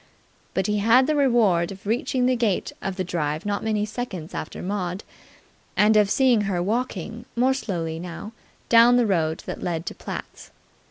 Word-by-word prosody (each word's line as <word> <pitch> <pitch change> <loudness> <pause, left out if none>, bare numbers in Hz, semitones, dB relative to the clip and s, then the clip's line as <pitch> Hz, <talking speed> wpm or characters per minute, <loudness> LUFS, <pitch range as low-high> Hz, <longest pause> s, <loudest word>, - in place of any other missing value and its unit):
But 190 - +1
he 210 0 0
had 230 +5 +5
the 305 +2 +1
reward 225 -12 +3
of 195 +1 -11
reaching 250 +3 0
the 255 0 +3
gates 225 -6 0
of 195 - -3
the 185 - -2
drive 155 -2 -2
not 205 -1 -2
many 215 -1 0
seconds 210 -8 -6
after - - -6
Maud, 185 -1 -3 0.7
and 215 +1 +5
of 210 -2 +4
seeing 250 -2 +4
her 180 -3 0
walking 225 +2 -3
more 255 +3 +3
slowly 165 -10 -3
now 175 +4 -7 0.4
down 235 +1 +6
the 245 - +3
road 165 -6 0
that - - -6
led 165 -1 -2
to - - -4
Platt's. - - -8
210 Hz, 175 wpm, -24 LUFS, 180-240 Hz, 0.7 s, down